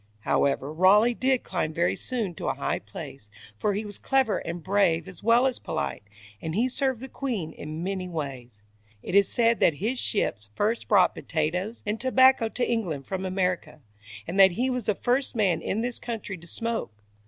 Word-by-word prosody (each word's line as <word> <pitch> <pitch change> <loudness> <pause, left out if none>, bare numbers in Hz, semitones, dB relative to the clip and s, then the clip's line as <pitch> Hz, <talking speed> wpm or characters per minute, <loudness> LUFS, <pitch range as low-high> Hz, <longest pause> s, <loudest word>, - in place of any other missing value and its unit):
However, 140 +6 +1
Raleigh 205 +8 +5
did 260 +1 +1
climb 155 - -2
very 90 +2 +2
soon 225 - -2
to - - -6
a - - 0
high - - -1
place, 110 -6 -10 0.3
for 205 - +1
he 215 +2 -3
was 205 -1 -7
clever 265 -5 +2
and 170 0 -6
brave 185 -4 +2
as 185 -3 -10
well 230 +3 +4
as 260 -2 0
polite, 155 -9 -3 0.4
and 160 0 -4
he 235 +5 +2
served 260 -2 -1
the 265 - -6
queen 230 - -3
in 155 +2 -6
many 185 -1 -3
ways. 130 -9 -6 0.4
It - - -5
is 200 0 +6
said 230 -1 +3
that 160 - +4
his 225 - -2
ships 105 - -1
first 220 +3 0
brought 200 -3 +5
potatoes 180 +8 -2
and 210 +2 -2
tobacco 260 -2 +5
to 245 - -1
England 175 - -2
from 190 0 -3
America, 185 -4 -1 0.5
and 190 +4 -3
that 190 -2 +8
he 255 +7 0
was 250 -1 -3
the 210 - +2
first 255 +4 0
man 195 -7 +2
in 215 - -1
this 245 0 -3
country 225 -4 -5
to 170 -1 -13
smoke. 225 - -3
200 Hz, 190 wpm, -26 LUFS, 165-235 Hz, 0.5 s, that